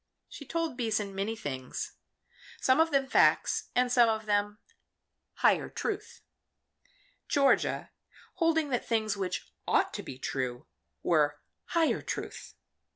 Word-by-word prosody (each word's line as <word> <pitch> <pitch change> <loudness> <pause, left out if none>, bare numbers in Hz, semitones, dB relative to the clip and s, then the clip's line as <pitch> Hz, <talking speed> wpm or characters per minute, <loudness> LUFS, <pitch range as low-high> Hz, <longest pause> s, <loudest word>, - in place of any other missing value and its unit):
She 285 - -10
told 330 -6 -2
Beason 215 -4 -1
many 200 +3 -2
things 130 - -5 0.7
some 260 +3 +3
of 325 0 +5
them 275 -3 +2
facts - - +3
and 250 0 +3
some 240 -2 +6
of 220 -1 -1
them 205 0 +1 0.8
"higher - - +3
truth," 425 -2 -4 1.1
Georgia 275 -1 +2 0.5
holding 325 -3 +2
that 245 -3 0
things 220 -3 +1
which 190 -2 -4
ought - - +2
to - - -4
be 130 - -8
true 130 0 -3 0.4
were 150 -3 +2 0.3
higher 330 -2 +2
truth. - - -6
225 Hz, 125 wpm, -30 LUFS, 195-280 Hz, 1.1 s, some